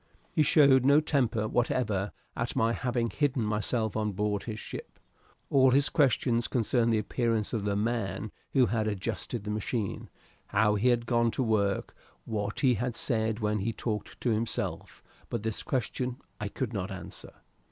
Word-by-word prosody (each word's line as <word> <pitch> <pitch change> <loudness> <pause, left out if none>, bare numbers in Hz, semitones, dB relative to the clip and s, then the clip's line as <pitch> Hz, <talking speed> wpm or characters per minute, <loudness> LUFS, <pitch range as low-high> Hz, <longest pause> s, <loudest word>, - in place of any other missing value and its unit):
He - - +2
showed 140 -3 +6
no 140 +3 +6
temper 125 -8 +1
whatever 110 -4 0 0.2
at 115 +1 -3
my 115 -2 +2
having 120 -2 -1
hidden 140 -5 0
myself 110 +1 0
on 105 -1 -1
board 105 +1 -1
his 110 -2 -5
ship. - - -8 0.5
All 130 -1 +6
his 140 +2 +4
questions 120 -4 +2
concerned 115 0 +1
the 110 - +3
appearance 115 0 0
of 105 -3 -1
the 100 -1 0
man 105 -2 -1 0.2
who 130 -3 +5
had 110 -1 0
adjusted 105 +2 -3
the 105 - -3
machine, 105 0 -3 0.4
how 105 +1 +3
he 105 +4 +1
had 120 -1 +3
gone 120 -1 +2
to 130 - -1
work, 100 -4 0 0.3
what 105 -1 -3
he 130 -3 +5
had 120 +2 -2
said 110 -3 0
when 105 0 +1
he 115 +4 -1
talked 110 -2 -4
to 120 - +1
himself 110 +1 -3 0.3
but - - -3
this 110 -2 -2
question 125 0 -2 0.2
I 105 - -2
could 115 +3 -4
not 95 -2 -2
answer. 95 -2 -8
115 Hz, 170 wpm, -29 LUFS, 105-125 Hz, 0.5 s, showed